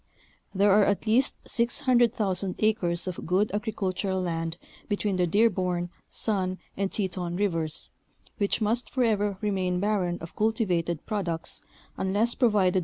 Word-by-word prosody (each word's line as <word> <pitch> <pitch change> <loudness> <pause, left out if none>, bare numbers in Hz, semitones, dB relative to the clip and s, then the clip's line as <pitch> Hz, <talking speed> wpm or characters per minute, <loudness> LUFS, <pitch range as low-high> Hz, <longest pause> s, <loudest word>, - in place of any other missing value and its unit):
There 200 +1 +3
are 205 +2 +6
at 200 +2 +1
least 235 +5 +3
600,000 235 -6 +1
acres 190 -6 +1
of 185 -2 -5
good 190 +5 +2
agricultural 200 -3 -1
land 165 -2 -2 0.3
between 205 -2 0
the 180 -1 +2
Dearborn, 180 -3 +1 0.2
Sun, 185 -4 -1 0.2
and 195 0 -1
Teton 180 -3 -2
Rivers, 165 -5 -1 0.5
which 200 +2 +1
must 225 +3 +1
forever 210 -6 +1
remain 185 -4 0
barren 190 -3 0
of 165 - -9
cultivated 185 -7 0
products 170 -7 -2 0.4
unless 205 +5 +2
provided. 205 -7 +3
195 Hz, 125 wpm, -27 LUFS, 180-215 Hz, 0.5 s, are